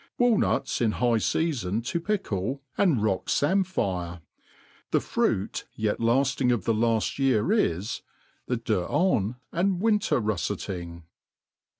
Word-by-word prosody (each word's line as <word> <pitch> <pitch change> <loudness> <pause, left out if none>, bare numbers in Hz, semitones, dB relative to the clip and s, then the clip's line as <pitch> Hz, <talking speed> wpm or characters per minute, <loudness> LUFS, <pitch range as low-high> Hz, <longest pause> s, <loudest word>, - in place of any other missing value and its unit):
Walnuts 245 - +2
in 110 -3 +2
high 120 -2 +2
feafon 115 - -1
to 170 - -1
pickle, 135 - -2
and 160 - +2
rock 100 -3 0
pimpfaire. 100 - 0 0.7
The - - +3
fruit 95 +2 -1
yet 110 -1 -1
laAing 130 +2 +2
of 120 -6 0
the 115 - +2
laft 115 +3 0
year 135 - +2
is, 100 - 0 0.5
the 125 - 0
deuxans 110 - +1 0.2
and 180 +1 +1
win 215 +1 +3
ter 195 - +1
rufleting. 85 -4 -3
115 Hz, 120 wpm, -26 LUFS, 100-165 Hz, 0.7 s, The